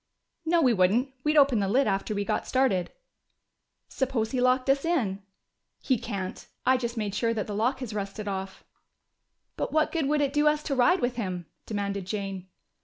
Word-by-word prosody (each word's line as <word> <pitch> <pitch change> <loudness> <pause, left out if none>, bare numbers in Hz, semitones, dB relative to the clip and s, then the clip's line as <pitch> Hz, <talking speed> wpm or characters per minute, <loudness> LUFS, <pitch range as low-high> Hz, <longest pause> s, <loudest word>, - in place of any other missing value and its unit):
"No, 335 0 +4
we 250 -3 +5
wouldn't. 225 +8 +2
We'd 305 +1 +2
open 275 -6 +5
the 200 - 0
lid 255 +8 +3
after 200 +1 -1
we 200 0 -1
got 215 - -1
started." 255 -9 +1 1.0
"Suppose 250 -5 -1
he 255 - 0
locked 255 +1 +3
us 275 +1 +3
in?" 235 - 0 0.6
"He 260 -4 +1
can't. 195 -5 -5 0.2
I 260 - +5
just 235 -2 -3
made 210 -3 -2
sure 230 +2 0
that 215 - -1
the 210 - -5
lock 245 +6 0
has 235 -4 -5
rusted 205 0 -4
off." 190 -1 -5 0.9
"But - - -2
what 310 0 +2
good 320 -5 0
would 300 +1 +2
it 280 -1 0
do 295 0 +3
us 300 0 +2
to 280 - -1
ride 345 +9 +4
with 245 0 -1
him?" 185 -6 -3 0.2
demanded 200 -3 -3
Jane. 195 -2 -4
235 Hz, 190 wpm, -27 LUFS, 200-270 Hz, 1.0 s, we